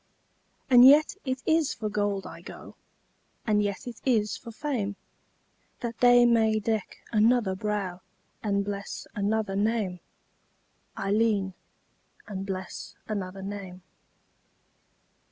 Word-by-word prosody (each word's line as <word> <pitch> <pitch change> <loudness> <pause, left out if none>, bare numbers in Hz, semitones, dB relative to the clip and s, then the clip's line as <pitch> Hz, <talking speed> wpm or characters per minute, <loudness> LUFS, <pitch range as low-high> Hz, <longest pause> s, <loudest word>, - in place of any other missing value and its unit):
And 245 -2 +8
yet 290 +4 +7
it 260 0 -2
is 320 -2 +2
for 215 - -3
gold 205 -2 -1
I - - -9
go, - - -11 0.7
And 210 -2 +3
yet 205 +3 -2
it 240 -2 -8
is 215 -5 +2
for 235 - -10
fame, 225 -6 -2 0.9
That 235 -1 -4
they 245 0 +7
may 220 -2 +3
deck 215 -1 -2
another 220 -2 +3
brow 195 -3 -3 0.4
And 200 -2 0
bless 200 -1 -5
another 205 0 0
name, 205 -3 0 1.0
Ailleen, 200 -1 +1 0.7
And 195 -1 -5
bless 185 -2 -6
another 195 -2 -4
name. 195 -2 -7
210 Hz, 115 wpm, -27 LUFS, 195-235 Hz, 1.0 s, And